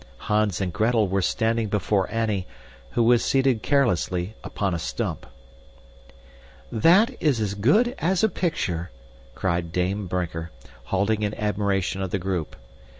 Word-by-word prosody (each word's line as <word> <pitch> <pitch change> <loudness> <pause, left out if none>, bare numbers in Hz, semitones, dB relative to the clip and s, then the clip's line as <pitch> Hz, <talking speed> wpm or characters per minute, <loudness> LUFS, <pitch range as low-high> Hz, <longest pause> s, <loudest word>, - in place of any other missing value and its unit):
Hans 105 -3 0
and 95 -3 -2
Gretel 110 0 +2
were 95 +1 0
standing 110 +3 0
before 100 -1 0
Annie, 110 -5 -1 0.5
who 120 - +2
was 120 0 +4
seated 135 -4 +2
carelessly 95 - +1
upon 100 -3 -2
a 85 - -2
stump. - - -4 1.4
"That 175 - +5
is 145 -8 +2
as 105 -2 -1
good 155 - +3
as 180 +3 +1
a 220 - +5
picture!" 95 - -2 0.5
cried 85 -2 -1
Dame 95 +3 -1
Brinker, 85 -2 -3 0.4
halting 100 +6 0
in 105 0 -1
admiration 100 -2 -1
of 95 - -2
the 100 - -1
group. 90 -4 -3
105 Hz, 140 wpm, -24 LUFS, 90-115 Hz, 1.4 s, That